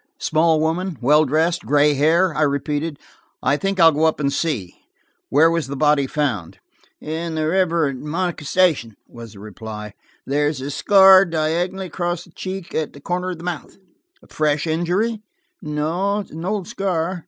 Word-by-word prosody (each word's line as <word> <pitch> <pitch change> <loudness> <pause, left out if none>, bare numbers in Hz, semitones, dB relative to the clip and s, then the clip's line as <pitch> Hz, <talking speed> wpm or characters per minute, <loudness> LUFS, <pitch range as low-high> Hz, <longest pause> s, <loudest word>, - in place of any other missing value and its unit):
"Small 160 0 +2
woman, 165 +2 -1
well 150 +5 +4
dressed, 160 +5 +1
gray 145 +1 +4
hair?" 160 +5 +2
I 150 - -2
repeated. 145 +1 -1 0.5
"I 145 - +3
think 195 +4 -2
I'll 165 -1 +7
go 155 +1 +1
up 160 - +1
and 140 -1 0
see. 125 - -2 0.6
Where 160 +4 +4
was 165 -5 -1
the 140 - -5
body 150 -1 +2
found 105 - -2 0.3
?" - - -35
"In 160 +1 -4
the 155 0 -1
river 170 -2 +2
at 135 -2 -4
Monica 170 +3 -3
Station," 150 - +1
was 115 -3 -11
the 100 - -13
reply. 105 0 -8 0.3
"There 145 +2 +1
is 150 -2 -2
a 135 +2 -5
scar 190 +3 +7
diagonally 170 +3 -1
across 175 -1 -3
the 175 - -19
cheek 185 +1 -6
to 155 -2 -1
the 140 - -15
corner 180 +5 -3
of 180 - -5
the 165 - -12
mouth." 175 -4 -6 0.5
"A - - -19
fresh 150 0 0
injury?" 180 +8 -1 0.4
"No, 175 +7 -1
an 165 +2 -8
old 200 -1 -2
scar." 185 -2 -2
160 Hz, 175 wpm, -21 LUFS, 145-175 Hz, 0.6 s, I'll